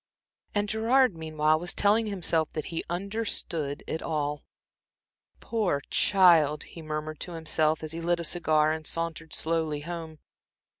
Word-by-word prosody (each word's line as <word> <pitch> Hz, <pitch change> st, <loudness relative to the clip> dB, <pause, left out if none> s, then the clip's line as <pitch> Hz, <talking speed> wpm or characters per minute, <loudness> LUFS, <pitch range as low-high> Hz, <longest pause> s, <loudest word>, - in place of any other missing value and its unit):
And 205 Hz, 0 st, +1 dB
Gerard 225 Hz, +1 st, +3 dB
meanwhile 155 Hz, -1 st, +1 dB
was 175 Hz, +1 st, -4 dB
telling 215 Hz, +2 st, +3 dB
himself 170 Hz, -5 st, 0 dB
that 155 Hz, -, -3 dB
he 165 Hz, -, -2 dB
understood 175 Hz, -6 st, -2 dB
it 160 Hz, -, -3 dB
all. 150 Hz, -2 st, -2 dB, 1.0 s
"Poor 210 Hz, -11 st, 0 dB
child!" 165 Hz, -6 st, +5 dB
he 165 Hz, -, -11 dB
murmured 155 Hz, 0 st, -4 dB
to 175 Hz, -, -5 dB
himself, 160 Hz, -1 st, +1 dB
as 155 Hz, -, -5 dB
he 165 Hz, +1 st, -4 dB
lit 170 Hz, +1 st, +1 dB
a -, -, -3 dB
cigar 155 Hz, -2 st, +2 dB
and 160 Hz, 0 st, -3 dB
sauntered 165 Hz, -1 st, -4 dB
slowly 160 Hz, -2 st, -1 dB
home. 165 Hz, -1 st, -6 dB
165 Hz, 145 wpm, -28 LUFS, 155-180 Hz, 1.0 s, child